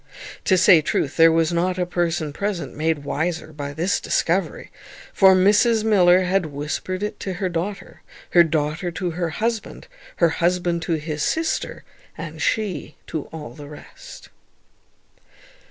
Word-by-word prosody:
To 190 - +4
say 175 -2 +6
truth, 145 -1 -1
there 165 0 +6
was 165 +1 +1
not 180 +2 0
a 180 - 0
person 170 -3 -2
present 200 0 -4
made 155 -1 -1
wiser 160 +2 -3
by 145 -1 -5
this 170 +7 0
discovery; - - -1 0.4
for 190 -1 +6
Mrs 210 +4 +4
Miller 185 -4 +5
had 185 -1 0
whispered 155 +6 -4
it 210 - -4
to 190 - -4
her 185 0 -2
daughter, 180 +4 -5 0.3
her 175 - +7
daughter 155 +2 -1
to 175 +1 -3
her 170 0 -2
husband, 225 +6 -3 0.3
her 170 - +3
husband 175 0 0
to - - +2
his 155 -1 -3
sister, 320 - -2 0.3
and 160 0 -7
she 185 -6 -2
to 155 -3 -5
all 150 -7 -9
the 145 +2 -11
rest. 150 - -13
170 Hz, 150 wpm, -22 LUFS, 155-185 Hz, 0.4 s, her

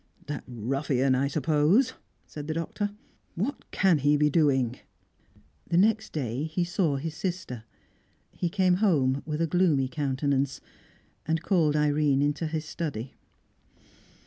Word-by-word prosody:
"That 150 -1 -5
ruffian, 130 +2 0
I 135 +2 +2
suppose," 155 - +2 0.3
said 150 -1 -8
the 155 - -2
Doctor. 185 +5 -2 0.5
"What 225 - -3
can 185 -6 +3
he 145 +2 +3
be 150 0 +3
doing?" 135 -6 +2 0.9
The 170 - +2
next 220 +3 +3
day 135 -1 -2
he 160 +3 -1
saw 175 -3 0
his 150 +3 -4
sister. 165 - -4 0.7
He 175 - -2
came 185 -1 +2
home 140 -10 +2
with 150 +1 -2
a - - +3
gloomy 165 -6 +2
countenance, 140 -1 -1 0.7
and 160 0 0
called 165 -7 +2
Irene 145 -2 +2
into 145 +3 0
his 155 0 -3
study. 140 -8 -5
150 Hz, 135 wpm, -27 LUFS, 135-170 Hz, 0.9 s, can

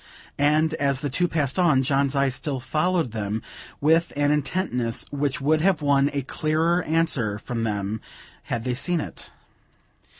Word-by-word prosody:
And, 155 +2 +3
as 140 -2 +2
the 145 - -2
two 175 +6 +2
passed 150 -1 -1
on, 150 -7 +4
John's 140 0 +1
eye 140 0 +3
still 135 +1 -3
followed 160 +1 0
them, 105 0 -3 0.4
with 160 +3 +3
an 145 0 +2
intentness 135 -6 -1
which 145 -1 -1
would 155 +2 +2
have 175 -3 +2
won 140 -1 +3
a 140 -2 -2
clearer 160 +5 +1
answer 150 -10 +1
from 115 +2 -4
them, 105 0 -2 0.4
had 115 - -3
they 125 - -1
seen 170 +7 0
it. - - -7
145 Hz, 160 wpm, -24 LUFS, 125-160 Hz, 0.4 s, on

